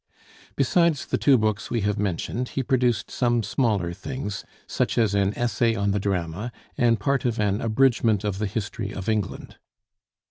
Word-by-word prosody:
Besides 160 Hz, +2 st, +2 dB
the -, -, -1 dB
two 140 Hz, -2 st, +5 dB
books 110 Hz, -3 st, -1 dB
we 115 Hz, -, 0 dB
have 105 Hz, +1 st, 0 dB
mentioned, 105 Hz, +6 st, -2 dB
he 135 Hz, -, +2 dB
produced 125 Hz, -2 st, +1 dB
some 120 Hz, -2 st, +1 dB
smaller 105 Hz, -9 st, 0 dB
things, 105 Hz, -1 st, -5 dB, 0.2 s
such -, -, -1 dB
as 110 Hz, -4 st, +3 dB
an 100 Hz, -1 st, +2 dB
'Essay 120 Hz, -1 st, +1 dB
on 100 Hz, -2 st, 0 dB
the 100 Hz, -, +1 dB
Drama,' 95 Hz, +3 st, -2 dB, 0.2 s
and 120 Hz, -4 st, +3 dB
part 135 Hz, +5 st, 0 dB
of 120 Hz, -3 st, -1 dB
an 105 Hz, -1 st, +1 dB
'Abridgment 115 Hz, -3 st, +2 dB
of 100 Hz, -2 st, -2 dB
the 105 Hz, -, 0 dB
History 105 Hz, 0 st, -4 dB
of 95 Hz, -1 st, -6 dB
England.' 110 Hz, -3 st, -2 dB
110 Hz, 170 wpm, -25 LUFS, 100-120 Hz, 0.2 s, two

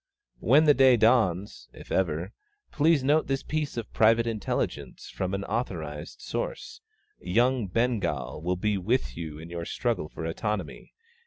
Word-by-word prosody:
When 150 Hz, +4 st, +5 dB
that 145 Hz, -2 st, +5 dB
day 130 Hz, -2 st, +6 dB
dawns 110 Hz, -5 st, +2 dB
if -, -, -13 dB
ever 85 Hz, 0 st, 0 dB, 0.4 s
please 155 Hz, -2 st, +3 dB
note 150 Hz, +4 st, +3 dB
this 135 Hz, -1 st, -1 dB
piece 155 Hz, -4 st, -3 dB
of 115 Hz, -, -5 dB
private 115 Hz, +1 st, +4 dB
intelligence 110 Hz, -3 st, -3 dB
from 95 Hz, +1 st, -2 dB
an 100 Hz, -, -3 dB
authorised 80 Hz, -10 st, -4 dB
source: -, -, -5 dB, 0.4 s
_Young 115 Hz, +2 st, +1 dB
Bengal 115 Hz, -7 st, -1 dB
will 90 Hz, +3 st, 0 dB
be 105 Hz, +1 st, 0 dB
with 95 Hz, -, 0 dB
you 80 Hz, -3 st, -6 dB
in 80 Hz, +2 st, -10 dB
your 85 Hz, -1 st, -4 dB
struggle 115 Hz, -10 st, -2 dB
for 80 Hz, -, -7 dB
Autonomy. 105 Hz, +6 st, -4 dB
110 Hz, 150 wpm, -27 LUFS, 90-125 Hz, 0.4 s, day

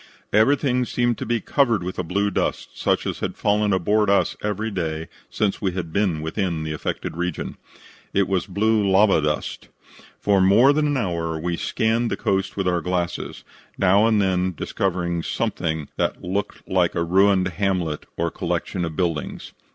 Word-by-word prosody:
"Everything 125 Hz, +3 st, +3 dB
seemed 120 Hz, -1 st, 0 dB
to -, -, -4 dB
be 120 Hz, 0 st, +1 dB
covered 115 Hz, -6 st, +1 dB
with 90 Hz, +1 st, -5 dB
a -, -, 0 dB
blue 100 Hz, +4 st, 0 dB
dust, -, -, -1 dB
such -, -, 0 dB
as -, -, -3 dB
had -, -, -3 dB
fallen 105 Hz, 0 st, +2 dB
aboard 105 Hz, +3 st, +2 dB
us 100 Hz, -, +2 dB
every 105 Hz, +2 st, -2 dB
day 80 Hz, -4 st, -3 dB, 0.2 s
since 105 Hz, 0 st, -1 dB
we 95 Hz, -4 st, 0 dB
had 85 Hz, -3 st, -5 dB
been 95 Hz, -6 st, +1 dB
within 85 Hz, -1 st, -2 dB
the 80 Hz, -, -3 dB
affected 75 Hz, -, -4 dB
region. 90 Hz, -1 st, -3 dB, 0.6 s
It 100 Hz, -1 st, +2 dB
was 95 Hz, -2 st, 0 dB
blue 105 Hz, +3 st, +2 dB
lava 95 Hz, -3 st, +5 dB
dust. 75 Hz, 0 st, -2 dB, 0.5 s
For 100 Hz, -2 st, +3 dB
more 110 Hz, +9 st, +6 dB
than 150 Hz, 0 st, +1 dB
an 145 Hz, -1 st, 0 dB
hour 85 Hz, -7 st, -2 dB
we 85 Hz, +2 st, -1 dB
scanned 115 Hz, +6 st, 0 dB
the 100 Hz, -, -2 dB
coast 95 Hz, 0 st, -1 dB
with 95 Hz, -2 st, 0 dB
our 90 Hz, -1 st, +1 dB
glasses, 90 Hz, +1 st, -3 dB, 0.3 s
now 100 Hz, +3 st, +4 dB
and 110 Hz, -2 st, +3 dB
then 95 Hz, -2 st, +1 dB
discovering 85 Hz, -3 st, -1 dB
something 80 Hz, -7 st, -2 dB
that -, -, -1 dB
looked 100 Hz, +3 st, -3 dB
like 90 Hz, -2 st, +1 dB
a 85 Hz, -, +1 dB
ruined 95 Hz, +2 st, +3 dB
hamlet 90 Hz, -4 st, -1 dB
or 85 Hz, 0 st, 0 dB
collection 90 Hz, +2 st, -2 dB
of 80 Hz, -2 st, -5 dB
buildings. 85 Hz, -4 st, -2 dB
95 Hz, 175 wpm, -23 LUFS, 85-105 Hz, 0.6 s, more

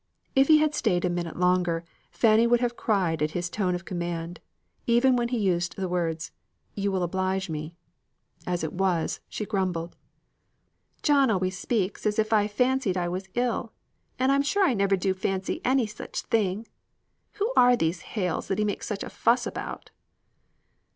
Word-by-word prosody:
If 270 Hz, 0 st, +5 dB
he 310 Hz, -, +7 dB
had 305 Hz, 0 st, +2 dB
stayed 190 Hz, -11 st, +1 dB
a 180 Hz, -, +1 dB
minute 175 Hz, -2 st, -3 dB
longer, 180 Hz, -2 st, +1 dB, 0.2 s
Fanny 225 Hz, 0 st, +4 dB
would 240 Hz, 0 st, +4 dB
have 240 Hz, -1 st, -1 dB
cried 185 Hz, -10 st, 0 dB
at 155 Hz, +1 st, 0 dB
his 175 Hz, 0 st, -3 dB
tone 185 Hz, -4 st, 0 dB
of 175 Hz, 0 st, -6 dB
command, 170 Hz, -1 st, -4 dB, 0.5 s
even 245 Hz, +2 st, +4 dB
when 240 Hz, -1 st, +1 dB
he 245 Hz, 0 st, -1 dB
used 175 Hz, -5 st, 0 dB
the 190 Hz, -1 st, -2 dB
words, 165 Hz, -3 st, -2 dB, 0.4 s
"You 200 Hz, 0 st, -1 dB
will 190 Hz, -2 st, 0 dB
oblige 190 Hz, +1 st, -1 dB
me." 155 Hz, +2 st, -5 dB, 0.7 s
As 175 Hz, -2 st, -1 dB
it 160 Hz, -, -3 dB
was, 180 Hz, -3 st, 0 dB
she 210 Hz, -, -4 dB
grumbled. 185 Hz, -5 st, -2 dB, 1.1 s
"John 280 Hz, -4 st, +4 dB
always 185 Hz, -3 st, 0 dB
speaks 210 Hz, -2 st, -1 dB
as 210 Hz, -, 0 dB
if 220 Hz, 0 st, +1 dB
I 210 Hz, -1 st, +4 dB
fancied 250 Hz, -2 st, +1 dB
I 175 Hz, -1 st, -1 dB
was 185 Hz, +2 st, -5 dB
ill, 240 Hz, -2 st, -1 dB, 0.4 s
and 260 Hz, +1 st, +2 dB
I -, -, +4 dB
am -, -, +3 dB
sure 390 Hz, +8 st, +2 dB
I -, -, +2 dB
never 195 Hz, -2 st, +2 dB
do 190 Hz, +1 st, 0 dB
fancy 190 Hz, 0 st, -2 dB
any 260 Hz, -1 st, +3 dB
such 210 Hz, 0 st, -6 dB
thing. 215 Hz, -1 st, 0 dB, 0.7 s
Who 425 Hz, +4 st, -1 dB
are 245 Hz, 0 st, +6 dB
these 170 Hz, -5 st, -1 dB
Hales 185 Hz, -6 st, -3 dB
that 195 Hz, -, -1 dB
he 210 Hz, -, +1 dB
makes 205 Hz, -, -3 dB
such 210 Hz, -3 st, -3 dB
a -, -, -6 dB
fuss 240 Hz, +1 st, +2 dB
about?" -, -, -6 dB
195 Hz, 180 wpm, -26 LUFS, 175-235 Hz, 1.1 s, he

